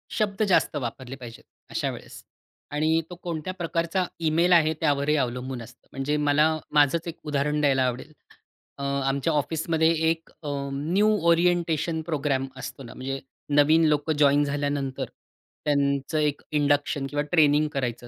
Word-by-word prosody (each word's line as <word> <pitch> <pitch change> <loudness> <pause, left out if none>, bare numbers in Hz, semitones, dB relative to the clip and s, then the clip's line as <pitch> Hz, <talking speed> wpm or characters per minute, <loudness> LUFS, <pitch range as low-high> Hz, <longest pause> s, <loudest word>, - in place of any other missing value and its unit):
शब्द 210 -1 0
जास्त 175 - +3
वापरले 125 +2 -5
पाहिजेत 120 -3 -11 0.3
अशा - - -1
वेळेस - - -11 0.5
आणि 155 +2 +2
तो 180 - -8
कोणत्या 170 +1 -4
प्रकारचा 170 +1 -1 0.2
ईमेल 170 +3 +3
आहे 160 -2 +5
त्यावरही 145 -1 +2
अवलंबून 125 -2 -2
असतं. 120 +1 -14
म्हणजे 135 +2 -1
मला 150 +1 +3 0.3
माझंच 150 +3 +3
एक 170 - -6
उदाहरण 150 +1 0
द्यायला 135 -3 +3
आवडेल. 125 +5 -5 0.7
अ, 140 - -6
आमच्या 140 +2 0
ऑफिसमध्ये 160 +2 +1 0.2
एक 165 0 -2
अ, 145 - -4 0.2
न्यू 175 +10 +2 0.2
ओरिएंटेशन 170 -2 +2
प्रोग्राम 145 -4 -1
असतो 130 +1 -7
ना. 120 - -10
म्हणजे 135 +1 -4 0.4
नवीन 160 +3 +5
लोकं 150 +1 +1
जॉइन 145 0 +4
झाल्यानंतर 140 -2 -2 0.6
त्यांचं 140 0 +1
एक 150 -1 0
इंडक्शन 145 -1 +1
किंवा 145 0 -1
ट्रेनिंग 150 -3 +4
करायचं 120 -3 -3
145 Hz, 145 wpm, -25 LUFS, 140-160 Hz, 0.7 s, आहे